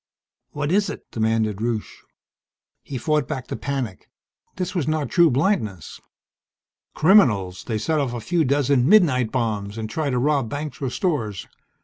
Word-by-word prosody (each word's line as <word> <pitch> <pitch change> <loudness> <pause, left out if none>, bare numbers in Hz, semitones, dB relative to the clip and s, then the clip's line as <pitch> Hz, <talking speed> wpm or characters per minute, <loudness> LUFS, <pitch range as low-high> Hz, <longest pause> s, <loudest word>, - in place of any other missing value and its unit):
"What 145 +1 -3
is 205 +2 +2
it?" - - -7
demanded 110 -2 0
Rusche. 115 -2 -3 0.8
He 135 - -6
fought 150 +2 0
back 130 -2 -4
the - - -5
panic. 135 -9 -4 0.5
This 185 -1 -3
was 175 -7 -1
not 155 -2 -1
true 170 -2 +5
blindness. 125 - -1 0.9
"Criminals. 115 - +3
They 110 - -2
set 155 +9 0
off 130 -4 -1
a - - -3
few 170 +6 0
dozen 140 -1 +2
'midnight' 140 - +4
bombs 105 -4 -2
and 110 -1 -3
try 150 +6 -2
to 125 - 0
rob 135 -2 +1
banks 145 +3 -5
or 135 - -1
stores. 120 - -2
135 Hz, 155 wpm, -23 LUFS, 110-155 Hz, 0.9 s, true